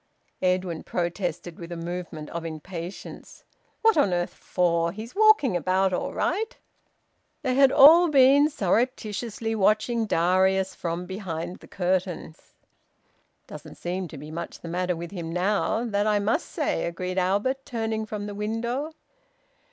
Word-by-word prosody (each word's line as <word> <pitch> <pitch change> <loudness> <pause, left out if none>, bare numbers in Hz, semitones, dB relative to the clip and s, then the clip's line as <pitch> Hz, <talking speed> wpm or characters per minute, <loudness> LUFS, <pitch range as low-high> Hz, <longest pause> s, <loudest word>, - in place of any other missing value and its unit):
Edwin 180 -3 0
protested 175 -1 -3
with 170 0 -8
a 170 - -4
movement 170 -2 -6
of 170 0 -4
impatience 165 +3 -8 0.4
"What 450 -5 +5
on 200 -11 +3
earth 175 0 -1
for? 170 -1 0
He's 220 +5 -8
walking 425 - +5
about 185 +3 +1
all - - -2
right." 445 +3 -1 0.9
They 260 -2 +1
had 270 0 +5
all 330 +6 +8
been 280 +1 +6
surreptitiously 225 - -1
watching 220 +2 +2
Darius 190 +2 +2
from 170 +1 -4
behind 180 -3 -5
the - - -16
curtains. 180 -3 -3 0.9
"Doesn't - - -10
seem 180 +1 -4
to 155 - -10
be 150 +2 -9
much 170 +2 -6
the - - -8
matter 180 +1 -1
with 170 0 -7
him 170 -4 -5
now! 205 +6 0
That 205 -2 0
I 210 -1 +3
must 215 - 0
say!" - - -1
agreed 180 +2 -3
Albert, 205 +9 0
turning 225 -3 -3
from 210 -1 -5
the 205 - -5
window. 235 +9 -3
190 Hz, 145 wpm, -26 LUFS, 175-225 Hz, 0.9 s, all